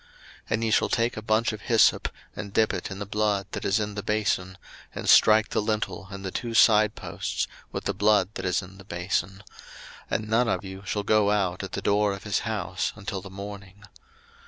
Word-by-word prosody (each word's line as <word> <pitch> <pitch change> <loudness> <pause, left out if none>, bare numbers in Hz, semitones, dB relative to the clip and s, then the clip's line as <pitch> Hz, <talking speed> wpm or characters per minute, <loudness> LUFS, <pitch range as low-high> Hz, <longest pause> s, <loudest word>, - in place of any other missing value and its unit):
02:012:022 - - -27 0.4
And 110 +1 0
ye 110 - +1
shall - - +3
take 115 +1 +1
a 110 - -5
bunch 110 +1 +1
of 105 - -7
hyssop, 115 0 +3 0.3
and 100 - -6
dip 110 0 +3
it - - -4
in 95 - -6
the 100 - -5
blood 105 -1 0
that - - -5
is 100 +3 +2
in 105 -1 -3
the 105 - -4
bason, 100 -3 -1 0.4
and - - -5
strike 110 0 +6
the - - 0
lintel 105 -3 -2
and 100 -1 -8
the 95 - -3
two 115 +2 -4
side 105 -2 +5
posts - - -3 0.3
with - - -4
the - - -1
blood 105 -3 +3
that - - -6
is 90 +1 0
in 95 +1 -13
the - - -11
bason; 95 +1 -3 0.7
and 110 - -1
none 115 +3 +2
of 110 - -1
you 95 0 -8
shall 105 +3 -1
go 105 0 +3
out 95 -4 0
at - - -7
the - - -3
door 105 0 +2
of 100 - -8
his 105 -2 0
house 110 -6 -2
until 100 -1 -5
the 95 - -10
morning. 100 +1 -9
105 Hz, 220 wpm, -26 LUFS, 95-110 Hz, 0.7 s, strike